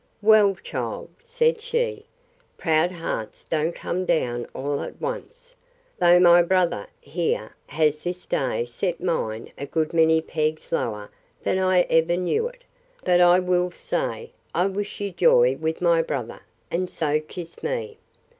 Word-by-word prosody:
Well, 210 -2 +6
child, - - -5
said 475 -1 +1
she, 470 -1 -2 0.5
proud 160 +1 +2
hearts 165 -11 -5
don't 160 +1 -1
come 185 +2 -3
down 120 -9 0
all 140 +1 -2
at - - -7
once; - - -6 0.5
though 175 -1 +6
my 175 -1 +7
brother, 175 - +1
here, 145 -7 -2
has 150 0 +1
this 180 +1 -4
day 125 -3 -1
set 170 +9 -3
mine 115 -11 -2
a 140 - -5
good 160 +1 -1
many 160 -1 +4
pegs 155 -1 -2
lower 105 -9 -2 0.3
than 185 - +1
I 185 -1 +4
ever 165 0 +2
knew 310 - 0
it: - - -14 0.4
But 180 -1 +4
I 175 0 +7
will 180 -1 +1
say, 175 - -4 0.2
I 175 +3 +3
wish 200 +1 -3
you 200 -1 -3
joy 485 - +4
with 160 +1 -3
my 170 -1 +4
brother; 135 -7 -4 0.3
and 180 +1 -1
so 155 -3 0
kissed 165 +2 -9
me. 465 -2 -3
175 Hz, 150 wpm, -24 LUFS, 155-195 Hz, 0.5 s, my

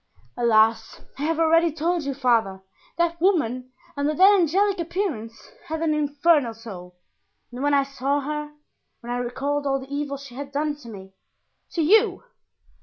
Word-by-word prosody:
"Alas! 225 -1 +2 0.2
I - - -5
have 325 0 0
already 330 +1 +4
told 330 +1 -1
you, 275 -1 -3
father, 225 -8 +1 0.3
that 340 -1 0
woman, 255 - +1 0.2
under 290 +1 -1
that 385 +4 +7
angelic 390 +2 +2
appearance, 320 - -4 0.2
had 320 +1 -3
an 315 -2 +2
infernal 290 -4 +2
soul, 185 -6 -10 0.6
and 245 +1 -7
when 290 0 +2
I 280 - +4
saw 275 +1 -1
her, 300 +1 -4 0.5
when 240 0 -7
I - - -1
recalled 275 +4 -2
all 270 0 +1
the 270 +1 -10
evil 285 -1 -3
she 275 -2 -12
had 280 +2 -7
done 295 +1 -1
to 240 -6 -12
me——" 190 -3 -11 0.6
"To 330 - 0
you? 415 +4 +3
285 Hz, 165 wpm, -24 LUFS, 245-325 Hz, 0.6 s, that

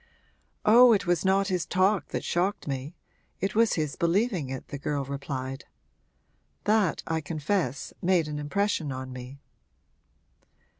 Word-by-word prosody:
'Oh, 235 +2 +8
it 200 - +1
was 175 -1 +1
not 195 +1 +2
his 180 -3 0
talk 190 +2 +1
that - - -4
shocked 180 +2 -1
me 140 +4 -4 0.4
it 195 0 -1
was 230 +1 +3
his 155 -3 -1
believing 175 - +1
it,' 130 -1 -6
the 140 - -6
girl 140 0 -2
replied. 135 -1 -5 1.0
'That, 210 -5 +2
I 160 -1 -1
confess, 155 -2 -2
made 175 -3 +2
an 150 -1 -4
impression 155 0 -1
on 130 0 -6
me.' 125 +2 -9
165 Hz, 140 wpm, -27 LUFS, 140-195 Hz, 1.0 s, Oh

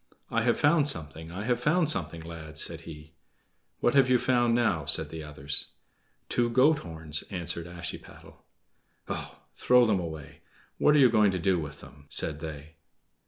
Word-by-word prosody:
"I 115 - +1
have 120 +1 +1
found 150 -1 +3
something! 80 - -5
I 95 +4 -5
have 120 +1 0
found 155 +6 +2
something, 85 - -2
lads!" 80 -2 -8
said 85 -1 -3
he. 80 0 -12 0.7
"What 120 - +2
have 135 -2 +4
you 125 - +5
found 120 -1 +2
now?" 100 -11 +1
said - - +4
the 80 -1 -7
others. 75 -1 -3 0.6
"Two 120 -1 0
goat 140 +6 +4
horns," 80 -2 -4
answered 85 -2 -4
Ashiepattle. 85 -1 -9 0.6
"Ugh! - - -5 0.2
Throw 125 -1 +4
them 105 -4 +2
away! 80 -4 -8 0.4
What 150 - +4
are - - +5
you 130 -4 +6
going 105 -3 +4
to 95 - -1
do 90 +1 +1
with 75 -2 -7
them?" 75 0 -15
said 75 -2 +1
they. 80 -1 -8
85 Hz, 170 wpm, -28 LUFS, 80-120 Hz, 0.7 s, you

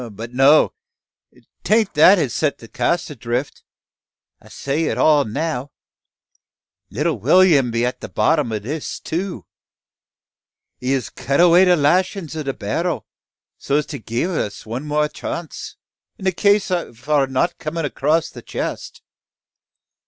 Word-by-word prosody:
But 115 +4 -8
no! 135 +4 +5 0.9
Tain't 215 -1 +2
that 180 +7 +7
has 140 -9 -1
set 150 -2 0
the 115 - -13
cask 160 +8 -1
adrift. 125 +1 -4 0.8
I - - -17
set 140 +2 -3
it 165 - -1
all 150 -3 +4
now. 145 +3 -3 1.2
Little 150 +8 -1
Will'm 170 -9 +4
be 115 +1 0
at 125 - -3
the - - -7
bottom 150 -7 +1
o' 110 - -1
this 140 +9 -5
too. 180 +3 -4 1.3
He 125 +1 -2
has 130 -4 -2
cut 140 +3 -2
away 175 +1 +6
the 180 -1 +5
lashin's 170 +2 +1
o' 155 - -3
the 140 -2 -2
barrel, 135 - -3 0.5
so 140 - -1
as 150 -1 +1
to - - -5
gie 115 +5 -2
us 170 - -3
one 120 +7 -5
more 150 0 +1
chance, 165 +2 -7 0.4
in 190 - -9
the 190 - +3
case 200 +2 +2
o' 175 -7 -1 0.2
our 145 -3 +3
not 130 +6 -1
comin' 165 +1 -3
across 150 +3 0
the - - -10
chest. - - -6
150 Hz, 150 wpm, -20 LUFS, 130-170 Hz, 1.3 s, that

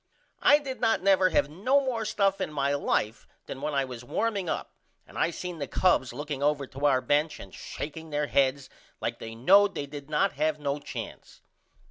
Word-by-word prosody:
I 290 - +7
did 275 -3 -6
not 225 -5 +2
never 190 -1 +5
have 155 - +2
no 205 - +2
more 250 -5 -2
stuff 200 -2 +1
in - - -2
my 140 -1 0
life 115 -5 -1 0.2
then 135 - -7
when 150 0 -2
I 135 -1 +2
was 125 -2 -8
warming 200 - -1
up - - -3 0.3
and - - -17
I - - +2
seen 175 0 -6
the 140 - -3
Cubs 155 -9 +2
looking 145 +2 -5
over 145 -1 +1
to 140 +2 -1
our 130 -3 +3
bench 150 +4 +1
and 95 - -11
shakeing 160 +2 -7
there 150 0 0
heads 135 -1 +1 0.3
like 115 0 -3
they 115 0 -7
knowed 195 - +5
they 145 - -3
did 145 0 -9
not 155 +6 +2
have 155 +1 0
no 145 0 -2
chance. 145 - -8
150 Hz, 200 wpm, -28 LUFS, 140-190 Hz, 0.3 s, I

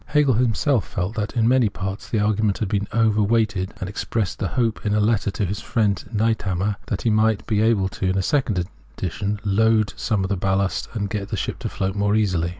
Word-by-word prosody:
Hegel 150 -3 +3
himself 120 - +1
felt 95 +3 -3
that 105 +2 -3
in 115 -1 +3
many 125 -3 +4
parts, 95 +1 -5
the 115 - 0
argument 105 -1 +1
had 110 - -2
been 100 +1 -1
overweighted,* 105 -3 +1
and 95 - -4
expressed 100 0 -2
the 95 - 0
hope, 115 -2 -1
in 105 -1 +1
a - - +3
letter 105 -1 +2
to 100 +1 -2
his 100 +3 -3
friend 105 -5 0
Niethammer, 105 -3 0
that 100 - -3
he 115 - +2
might 110 0 +2
be 105 -2 +1
able, 110 -4 +3
in 95 0 +1
a 95 - +1
second 110 -9 +1 0.3
edition, 100 +3 -2
to 105 - -19
' - - -23
unload 110 +1 +3
some 105 -3 0
of 95 - -2
the 100 - 0
ballast, 95 +1 0
and 100 -2 -1
get 100 -3 -3
the - - -2
ship - - -3
to - - -3
float 95 0 -2
more 100 +1 +1
easily.'! 90 -6 +1
105 Hz, 225 wpm, -22 LUFS, 95-110 Hz, 0.3 s, many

